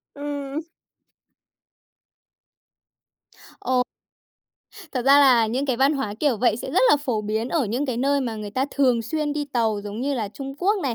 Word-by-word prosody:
Ừm. 285 +1 -4 3.0
Ồ. 255 -1 +1 1.1
Thật 255 - -1
ra 275 +1 +7
là 245 -5 +5
những 255 +6 -2
cái 260 -3 0
văn 270 +4 +3
hóa 215 -7 -3
kiểu 280 -6 +2
vậy 220 -1 +2
sẽ - - -6
rất - - +2
là - - +6
phổ 250 -7 -2
biến 220 +3 -2
ở 320 -5 +1
những 245 +7 -2
cái 250 -3 -2
nơi 280 +2 +1
mà 235 -4 -3
người 210 -1 -6
ta 260 +5 0
thường 250 -4 +2
xuyên 295 +5 -2
đi 295 -1 -2
tàu 225 -4 +1
giống 205 +2 -6
như 280 +2 -1
là 220 -5 -2
Trung 270 +6 -8
Quốc 405 +3 +2
này, 255 -4 -1
260 Hz, 180 wpm, -23 LUFS, 230-285 Hz, 3.0 s, ra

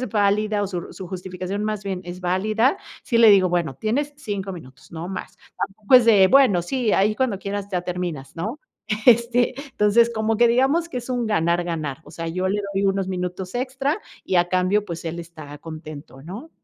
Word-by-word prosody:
es 255 - -3
válida 210 0 +1
o - - 0
su 185 -2 -4
r - - -9
su 190 - -8
justificación, 185 +2 -5
más 215 -1 -3
bien, 190 -2 -3
es 175 +1 -7
válida, 215 - +1 0.3
sí 235 - +1
le 230 -2 +8
digo: 190 -2 +5
"Bueno, 170 -5 -1
tienes 270 - -1
5 200 -8 -4
minutos, 150 -6 -12
no 165 +1 -5
más". 190 - -7 0.3
Tampoco 205 +5 0
es 250 -2 +9
de, 205 -4 +7
bueno, 255 -9 +5
sí, 240 +5 -1
ahí 205 +2 +3
cuando 240 -5 0
quieras 200 0 -4
ya 180 -2 -1
terminas, 175 -6 -4
¿no? 215 - -4 0.5
Este, 240 +1 +4 0.2
entonces, 225 +2 +3
como 220 0 0
que 240 +2 +5
digamos 270 +8 +2
que 295 - -7
es 245 - -9
un 245 -2 -1
ganar, 170 -4 +1
ganar. 155 -5 -3
O - - -14
sea, 165 - -6
yo 185 +3 -1
le 205 +2 0
doy 195 +1 +1
unos 195 -1 +1
minutos 180 0 -4
extra 270 +5 -1 0.3
y, 185 - 0
a 175 0 +3
cambio, 185 +3 +1
pues, 170 -2 -7
él 165 +1 -4
está 155 -3 -10
contento, 155 -3 -10
¿no? 205 - -9
195 Hz, 205 wpm, -23 LUFS, 175-230 Hz, 0.5 s, es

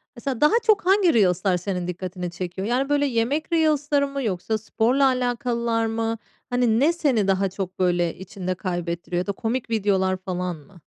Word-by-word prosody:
Mesela 255 +1 -4
daha 300 - +5
çok 420 -5 +3
hangi 380 -4 +4
reels'lar 185 -3 +3
senin 180 -1 -3
dikkatini 180 0 -5
çekiyor? 185 +2 -5
Yani, 260 +4 0
böyle, 290 0 +2
yemek 270 +7 -1
reels'ları 295 -3 +2
mı 275 -1 -4
yoksa 215 +1 -1
sporla 235 +5 +1
alakalılar 240 -2 0
mı? 225 0 -1 0.3
Hani, 245 -2 +2
ne 315 +5 +4
seni 260 - +1
daha 195 0 +2
çok, 190 -1 -6
böyle, 175 -2 +1
içinde 185 -1 -5
kaybettiriyor? 175 -1 -3
Ya 185 - -3
da - - +1
komik 230 +4 -3
videolar 195 -4 +1
falan 180 -1 -3
mı? 175 +4 -17
220 Hz, 170 wpm, -23 LUFS, 185-260 Hz, 0.3 s, daha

